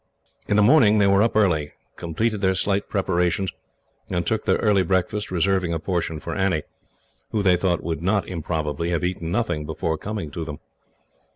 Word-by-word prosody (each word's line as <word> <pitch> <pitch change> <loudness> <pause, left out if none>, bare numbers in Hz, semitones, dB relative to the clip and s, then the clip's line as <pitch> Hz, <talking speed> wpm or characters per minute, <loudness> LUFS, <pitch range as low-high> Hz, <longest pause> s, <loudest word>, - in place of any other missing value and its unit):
In 105 - +1
the 105 - +5
morning 110 -3 +6
they 100 - +4
were 100 0 +4
up 115 0 +1
early, 80 -9 +2 0.2
completed 105 +6 -2
their 95 -1 +2
slight 100 +2 0
preparations, 95 -1 0 0.6
and 85 -1 -1
took 110 +3 -1
their - - +3
early 105 -3 +3
breakfast, 95 +3 0
reserving 90 -1 +1
a - - -2
portion 85 -2 -2
for - - -5
Annie, 95 -6 0 0.7
who, 105 -2 -1
they 90 -2 +5
thought, 90 -1 0
would 80 -1 -3
not 100 +3 +1
improbably 80 -2 -3
have 85 -1 -1
eaten 90 -2 -2
nothing 100 -8 -1
before 80 +1 -3
coming 105 -7 -5
to 85 - -4
them. 75 -2 -6
95 Hz, 180 wpm, -23 LUFS, 80-100 Hz, 0.7 s, morning